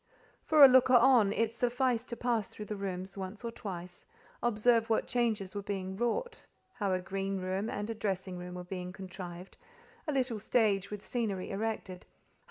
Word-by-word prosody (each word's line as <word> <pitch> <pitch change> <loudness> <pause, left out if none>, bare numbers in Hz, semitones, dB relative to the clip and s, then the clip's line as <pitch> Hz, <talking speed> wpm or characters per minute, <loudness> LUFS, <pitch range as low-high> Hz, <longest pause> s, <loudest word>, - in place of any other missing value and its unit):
For 305 -3 +8
a - - +11
looker 255 0 +6
on, 240 -4 +6
it 225 +1 0
sufficed 245 0 0
to 235 - -4
pass 235 -4 0
through 210 - -9
the 210 - -4
rooms 190 -1 -5
once 190 +4 -6
or 230 - -2
twice, 180 -5 -7 0.4
observe 230 0 +3
what 225 - +2
changes 220 -6 0
were 205 - -3
being 190 -1 -4
wrought, 240 - -2 0.3
how 205 -5 -1
a 185 - +1
green 195 +1 -3
room 190 +4 -2
and 205 -2 -3
a 225 - -2
dressing 190 -4 -3
room 180 0 -7
were 180 - -6
being 180 0 -5
contrived, 185 -1 -8 0.5
a - - +1
little 255 -5 0
stage 205 -3 +2
with 210 -1 -7
scenery 210 -6 -2
erected, 200 -3 -3
how - - -33
M. - - -38
205 Hz, 185 wpm, -32 LUFS, 190-235 Hz, 0.5 s, a